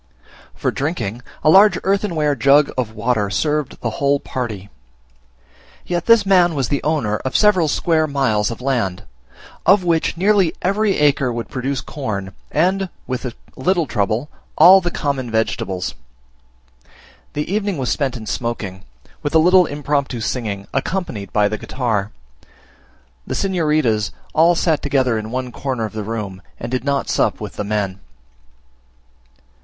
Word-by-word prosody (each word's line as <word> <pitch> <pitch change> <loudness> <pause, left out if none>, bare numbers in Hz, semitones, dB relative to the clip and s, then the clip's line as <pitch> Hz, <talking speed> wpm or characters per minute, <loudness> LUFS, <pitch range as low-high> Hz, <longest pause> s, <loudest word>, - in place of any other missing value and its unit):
For - - -1
drinking, 135 - -3 0.2
a - - +4
large 195 +1 +7
earthenware 185 -7 +1
jug 140 +4 +4
of 115 -4 -3
water 110 -2 0
served 150 +7 -1
the 115 - -1
whole 140 0 +3
party. 110 -8 -5 1.1
Yet 175 -1 -2
this 230 -3 +6
man 180 -4 +4
was 135 -4 -1
the 140 - 0
owner 140 -9 0
of 130 - -5
several 195 -6 +4
square 155 +1 +1
miles 130 -8 +1
of 115 +1 -7
land, 115 -9 -1 0.6
of 195 0 +5
which 165 -1 +1
nearly 195 -2 +3
every 200 +2 +1
acre 140 -3 +2
would 115 -1 -5
produce 135 0 -2
corn, 100 -9 -5 0.2
and, 185 +4 +1 0.2
with 130 0 -4
a 120 - -4 0.2
little 175 +4 +1
trouble, 115 +3 -1 0.3
all 185 +4 +8
the 175 - -1
common 140 -7 -2
vegetables. 105 -4 -1 1.4
The 150 +5 -3
evening 205 -4 -1
was 130 -3 -2
spent 135 -4 -1
in 110 - -9
smoking, 105 -6 -4 0.4
with 145 +2 -2
a - - +8
little 180 +2 +5
impromptu 145 -3 -2
singing, 105 -4 -3
accompanied 135 - -3
by 105 -1 +3
the 110 +1 -3
guitar. 110 -6 -2 1.2
The - - -3
signoritas 155 - +1 0.2
all 170 +2 +5
sat 160 -3 +1
together 130 -5 +1
in 110 0 -6
one 125 +1 -3
corner 125 -2 -3
of 110 - -7
the 110 - -4
room, 105 -3 -5 0.2
and - - -6
did 130 -1 -1
not 140 0 0
sup - - +1
with - - -6
the - - -4
men. 100 -2 -2
135 Hz, 150 wpm, -19 LUFS, 110-165 Hz, 1.4 s, all